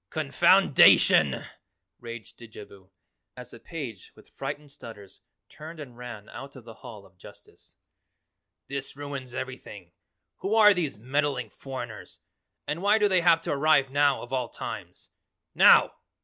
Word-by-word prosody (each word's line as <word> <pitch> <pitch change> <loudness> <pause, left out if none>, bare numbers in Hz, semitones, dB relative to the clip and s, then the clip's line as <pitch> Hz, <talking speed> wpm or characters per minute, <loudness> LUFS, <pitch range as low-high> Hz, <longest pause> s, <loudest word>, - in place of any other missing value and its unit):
"Confoundation!" - - +4 0.5
raged 115 -3 -10
Didjabo 105 -4 -14 0.5
as - - -10
the - - -12
page 130 - -8
with - - -20
frightened 145 -1 -7
stutters 110 -8 -13 0.3
turned 160 +1 -11
and 130 -5 -10
ran 120 -4 -10
out 140 +3 -10
of 130 - -12
the 115 - -11
Hall 105 -2 -12
of 95 -1 -24
Justice. - - -17 0.9
"This 140 0 -5
ruins 140 -3 -7
everything. 105 -8 -8 0.5
Who 200 +3 -2
are 210 -2 +7
these 160 - -3
meddling 130 -1 -2
foreigners? 125 -4 -9 0.5
And 155 +3 -4
why 205 +2 +3
do 210 -1 +3
they 185 -3 +2
have 165 -1 +4
to - - -4
arrive 140 -2 +2
now 145 -1 +2
of 120 - -10
all 125 -2 -2
times? - - -9 0.4
NOW! - - +6
135 Hz, 140 wpm, -26 LUFS, 115-150 Hz, 0.9 s, are